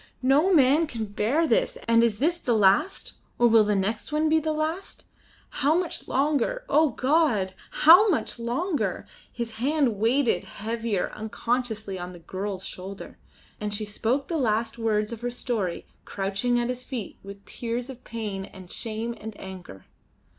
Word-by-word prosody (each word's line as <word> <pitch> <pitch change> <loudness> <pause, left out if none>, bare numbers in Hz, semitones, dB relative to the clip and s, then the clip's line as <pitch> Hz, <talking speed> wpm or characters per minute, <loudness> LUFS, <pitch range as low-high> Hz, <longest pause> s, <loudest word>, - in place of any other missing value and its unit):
No 285 +8 +4
man 300 0 +5
can 230 -6 -4
bear 220 +10 +1
this; - - +1
and 230 0 +5
is 225 -3 +2
this 335 +8 +1
the 240 -7 +1
last, 200 - +2 0.2
or 240 - +4
will 225 -1 +6
the 210 0 +1
next 215 +7 -1
one 305 +1 +2
be 320 +1 +4
the 315 0 -1
last? 315 +5 -3 0.6
How 290 +3 +4
much 355 -1 -2
longer? 300 - 0
O 305 +2 +4
God! 255 - +1 0.2
how 360 +8 +7
much 305 -7 -1
longer? 240 - -1 0.3
His 230 -2 -5
hand 265 -2 +1
weighed 250 +6 +3 0.2
heavier 220 0 -3
unconsciously 220 -2 -3
on 180 +1 -6
the - - -10
girl's 190 +3 -5
shoulder, 190 +2 -8 0.4
and 210 0 -2
she 215 +1 -2
spoke 235 +6 -1
the 335 - -1
last 225 -1 0
words 215 -1 0
of 230 -1 -7
her 245 - -1
story 225 -7 -3 0.2
crouching 200 +5 -1
at 240 0 -1
his 250 0 -3
feet 240 -7 -6
with 200 0 -11
tears 240 +1 -4
of 260 -2 -10
pain 210 -4 -5
and 185 -2 -13
shame 230 +1 -3
and 220 0 -8
anger. 185 - -10
235 Hz, 165 wpm, -26 LUFS, 210-285 Hz, 0.6 s, how